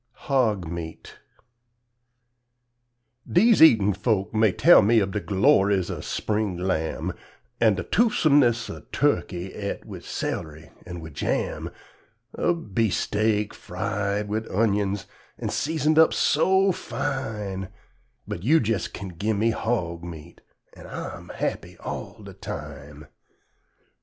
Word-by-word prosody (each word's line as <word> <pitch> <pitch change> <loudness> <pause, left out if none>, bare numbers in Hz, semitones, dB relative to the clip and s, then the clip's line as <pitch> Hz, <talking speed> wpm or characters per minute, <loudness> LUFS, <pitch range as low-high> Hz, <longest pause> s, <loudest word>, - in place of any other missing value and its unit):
HOG 110 - +1
MEAT 80 -1 -8 2.1
Deze 220 +5 +5
eatin' 105 -10 +7
folks 100 -2 -1
may 110 -2 +4
tell 175 - +7
me 110 +2 +4
ub 100 -2 -1
de 105 - -1
gloriz 95 -1 +3
ub - - -6
spring 105 -4 -2
lam', 90 -3 -2 0.5
An' 110 -3 +4
de 95 - -3
toofsumnis 145 - +3
ub - - -15
tuckey 95 -10 0
et 100 -1 -5
wid - - -9
cel'ry 75 -4 -5 0.2
an' 90 -1 -7
wid 80 -2 -9
jam; - - -2 0.7
Ub 165 - -1
beef 110 -1 +2
st'ak 105 0 0
fried 105 +1 -3
wid 110 +2 -2
unyuns, 100 -2 0 0.3
an' - - -3
sezoned 155 0 +1
up 160 - +5
so 190 +1 +3
fine 105 - -4 0.6
But - - -5
you' 145 - +4
jes' 110 - -1
kin 100 - -8
gimme 105 +5 0
hog 90 -8 -2
meat, 85 -1 -10 0.3
an' - - -12
I'm - - -7
happy - - -4
all - - -7
de - - -10
time. 75 0 -8
105 Hz, 120 wpm, -25 LUFS, 90-115 Hz, 2.1 s, eatin